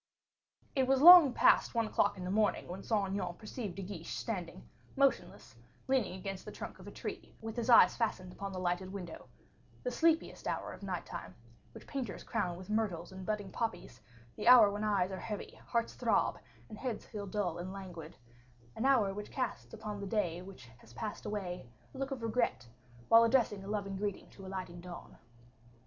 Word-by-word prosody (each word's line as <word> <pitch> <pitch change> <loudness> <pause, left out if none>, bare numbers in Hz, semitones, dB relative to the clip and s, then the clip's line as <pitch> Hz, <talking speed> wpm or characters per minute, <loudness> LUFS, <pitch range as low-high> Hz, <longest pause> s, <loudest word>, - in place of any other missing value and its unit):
It 265 -2 +2
was 270 0 +4
long 345 -5 +11
past 245 - +4
one 230 -1 +2
o'clock 205 -1 +1
in 185 - -6
the 180 - -3
morning 210 +1 +1
when 185 +2 -6
Saint 205 -4 0
Aignan 185 -3 -2
perceived 215 -3 -6
De 195 - -5
Guiche, 180 -3 -6
standing, 185 -5 -5 0.3
motionless, 275 0 0 0.3
leaning 255 -9 +1
against 195 0 -6
the - - -8
trunk - - -8
of - - -12
a - - -7
tree, - - -7
with 225 0 -6
his 240 0 -2
eyes 235 - +8
fastened 190 -6 -2
upon 200 +1 -6
the 185 - -6
lighted 185 +1 -1
window, 180 -4 -8 0.6
the - - -1
sleepiest 330 0 +1
hour - - -3
of - - -12
night 185 -3 -4
time, 90 0 -8 0.4
which - - -12
painters 260 -7 -5
crown 175 -1 -2
with 185 - -10
myrtles 205 -6 -1
and 190 -1 -9
budding 210 -2 -2
poppies, 225 - -4 0.3
the 210 - -4
hour 235 -5 +9
when 205 +1 -3
eyes 200 -3 +1
are 190 - -5
heavy, 210 +1 -6
hearts 235 -1 0
throb, - - +1 0.3
and 215 -1 -10
heads 245 -5 -4
feel 205 -3 -6
dull 185 -4 -2
and 180 +2 -5
languid 180 -5 -8 0.6
an 225 - -2
hour 235 -8 +4
which 210 +1 -6
casts 260 - -4
upon 215 -2 -6
the 200 - -4
day 180 -5 -1
which 185 -9 -11
has 115 - -17
passed 210 - -5
away 180 - -4 0.3
a - - -10
look 270 0 -2
of 265 -4 -5
regret, 225 - 0 0.4
while 230 0 +8
addressing 230 -4 +2
a - - -9
loving 200 -2 -3
greeting 200 0 -3
to - - -14
the 190 - -8
dawning 185 -2 -6
light. 175 0 -9
200 Hz, 195 wpm, -33 LUFS, 185-225 Hz, 0.6 s, long